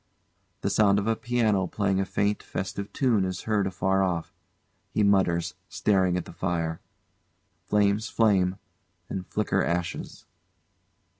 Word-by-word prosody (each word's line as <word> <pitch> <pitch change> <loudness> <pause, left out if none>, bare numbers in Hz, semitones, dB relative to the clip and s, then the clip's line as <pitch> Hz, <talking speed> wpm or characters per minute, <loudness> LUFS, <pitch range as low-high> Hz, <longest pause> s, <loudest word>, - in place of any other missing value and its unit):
[The 100 - 0
sound 100 0 +4
of 100 - 0
a 115 0 +2
piano 110 -6 +1
playing 95 0 0
a 95 - +1
faint 100 +2 0
festive 100 +1 -5
tune 120 -7 +2
is 95 -1 -3
heard 105 -3 +1
afar 95 +1 +1
off. 90 -3 -1 0.6
He 105 - +1
mutters, 95 -4 +2 0.2
staring 95 -3 +2
at 90 - -3
the - - -11
fire.] 85 -2 -2 0.9
[Flames 105 +1 +2
flame, 95 -5 +3 0.5
and 95 -1 -4
flicker - - 0
ashes. 85 -1 -3
95 Hz, 135 wpm, -27 LUFS, 90-105 Hz, 0.9 s, sound